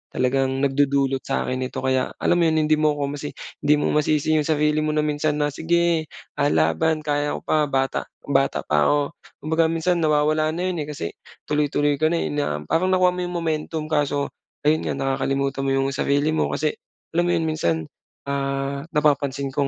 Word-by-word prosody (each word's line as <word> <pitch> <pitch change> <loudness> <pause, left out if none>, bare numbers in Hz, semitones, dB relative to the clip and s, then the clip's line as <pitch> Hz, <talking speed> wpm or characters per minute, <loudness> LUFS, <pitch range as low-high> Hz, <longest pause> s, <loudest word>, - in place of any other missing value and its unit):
talagang 135 +1 +1
nagdudulot 140 -1 +2
sa'kin 130 -1 -1
nito. 130 +1 -4
Kaya 130 0 +1
alam 175 - +3
mo 170 - +4
'yon 160 - +2
hindi 155 - +4
mo 155 -1 +2
ko 140 -1 -2
masi 145 0 -6 0.2
hindi 150 - +4
mo - - 0
masisi 150 +1 +2
'yung 150 - -1
sarili 150 -1 +2
mo 155 0 -1
na 150 - +2
minsan 150 0 0
na, 145 0 +1
"Sige, 170 +1 +1 0.3
ah, 145 - +3
laban 80 - +1
kaya 145 0 0
ko - - -9
pa 155 -1 +2
bata 135 -1 -1 0.2
bata 135 -1 +1
pa 75 -1 +2
ako," 145 0 +3 0.4
kumbaga 160 +1 +2
minsan 165 +2 0
nawawala 155 0 +2
na 180 +2 -1
yun, 175 - -4
eh, - - -9
kasi 110 - -4 0.4
tuloy-tuloy 145 -1 +1
ka 155 - +3
na, 170 - +1
eh, - - -2
na 145 -1 -2
parang 165 +3 +1
nakuha 185 -1 +4
mo 180 - -5
yung 175 - -6
momentum 160 -1 -2
kaso, 145 -2 0 0.3
ayun 155 +1 +3
nga - - -1
nakakalimutan 135 0 -1
mo - - +1
yung 135 0 +1
sarili 145 +2 +1
mo. 160 - +1
Kasi 155 -1 0 0.4
alam 175 +1 +2
mo 175 - +2
'yon 165 - 0
minsan, 155 - 0 0.5
ah, 140 0 -2
napapansin 140 -2 +1
ko 140 -1 +1
145 Hz, 195 wpm, -23 LUFS, 135-155 Hz, 0.5 s, mo